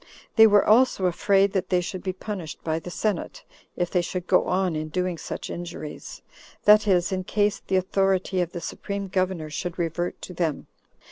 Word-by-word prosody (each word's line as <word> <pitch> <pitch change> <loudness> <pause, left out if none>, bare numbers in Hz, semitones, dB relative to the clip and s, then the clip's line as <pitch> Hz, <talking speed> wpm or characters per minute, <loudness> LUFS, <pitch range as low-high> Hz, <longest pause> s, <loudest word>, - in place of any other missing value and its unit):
They 225 -1 +9
were 205 -1 +5
also 220 -3 +4
afraid 195 +2 +3
that 190 -2 -1
they 180 - +3
should 180 +1 -5
be 185 - -2
punished 185 -4 -7
by 160 0 -1
the 180 - -8
senate, 200 0 -3 0.3
if 175 -1 -2
they 180 - +2
should 180 0 -4
go - - +3
on 185 -2 0
in 155 0 -3
doing 180 0 -2
such - - -6
injuries; 170 -3 -7 0.4
that 210 +1 +6
is, 180 -2 +2
in 185 -1 -1
case 205 +1 0
the 190 - +1
authority 190 0 +1
of 175 -1 -2
the 175 - -6
supreme 200 +1 -5
governor 185 -4 -1
should 175 +2 -4
revert 175 0 -2
to 180 - -7
them. 165 -4 -2
185 Hz, 190 wpm, -25 LUFS, 175-195 Hz, 0.4 s, They